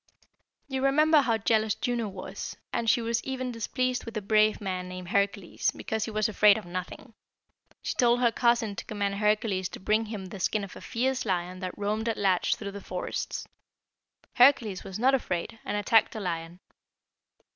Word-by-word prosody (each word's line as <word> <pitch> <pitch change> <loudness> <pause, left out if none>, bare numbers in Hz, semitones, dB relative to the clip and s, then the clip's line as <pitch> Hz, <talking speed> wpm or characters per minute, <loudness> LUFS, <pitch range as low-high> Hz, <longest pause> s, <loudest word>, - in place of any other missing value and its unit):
"You 265 -1 -2
remember 305 +3 +5
how 230 -4 +1
jealous 220 0 +1
Juno 235 0 -1
was, 190 -2 -7 0.2
and 230 -1 0
she 235 - +3
was 230 0 -1
even 255 -1 -3
displeased 250 +2 -1
with 230 -1 -6
a - - -2
brave 215 +1 +3
man 185 -2 -4
named 185 -1 -7
Hercules, 200 -2 0
because 220 -1 -3
he - - -5
was 215 -1 +1
afraid 210 -1 +5
of 215 - -7
nothing. 180 +6 -7 0.7
She - - -1
told 240 -1 +3
her 240 -2 +3
cousin 235 -3 +2
to - - -5
command 200 -2 -2
Hercules 210 -3 +1
to - - -9
bring 215 +3 +1
him 210 -3 -5
the 190 +1 -8
skin 205 +3 0
of 195 - -8
a - - -10
fierce 260 +2 -1
lion 185 -2 -2
that 185 -1 -5
roamed 215 +3 -1
at 225 - -1
large 190 -3 +2
through 200 -2 -6
the 200 0 -8
forests. 180 -1 -4 0.9
Hercules 245 -7 +4
was 190 - -6
not 255 +4 +3
afraid, 220 -4 -2
and - - -2
attacked 215 +1 +3
the 220 - -5
lion. 170 -2 -4
215 Hz, 185 wpm, -28 LUFS, 195-235 Hz, 0.9 s, remember